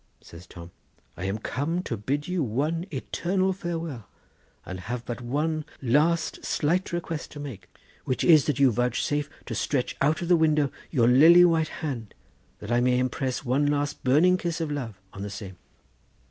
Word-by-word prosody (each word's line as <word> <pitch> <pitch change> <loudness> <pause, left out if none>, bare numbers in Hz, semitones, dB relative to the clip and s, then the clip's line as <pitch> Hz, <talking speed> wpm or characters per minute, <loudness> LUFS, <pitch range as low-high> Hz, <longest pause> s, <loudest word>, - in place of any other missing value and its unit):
Says 85 +1 -13
Tom: 85 0 -11 0.4
'I 90 - -5
am 95 +2 -1
come 150 +10 -2
to 115 - -3
bid 135 +8 -2
you 180 -1 -1
one 150 - -1
eternal 185 +7 -1
farewell, 165 - -5 0.6
and 95 0 -6
have 120 +6 -5
but 120 +1 -5
one 155 +6 -1 0.2
last 155 +6 +1
slight 175 +5 0
request 170 -2 -4
to 145 - -10
make, 115 -11 -8 0.3
which 130 - -1
is 155 -5 +6
that 145 -4 0
you 135 -2 +5
vouchsafe 125 +5 0 0.2
to - - -5
stretch 130 -4 -1
out 155 +5 +2
of - - -3
the 175 - +5
window 155 -4 +2 0.2
your 120 -7 +3
lily 165 +8 +8
white 165 -2 +2 0.2
hand, 120 -8 -5 0.4
that 105 - -8
I 120 0 +3
may 125 0 +3
impress 130 +1 -2
one 135 +4 +2
last 145 0 -1
burning 160 +8 +4
kiss 170 -2 -3
of 160 -2 -2
love 120 -9 -5
on 95 - -8
the 100 - -4
same. 100 -2 -8
145 Hz, 175 wpm, -26 LUFS, 120-165 Hz, 0.6 s, lily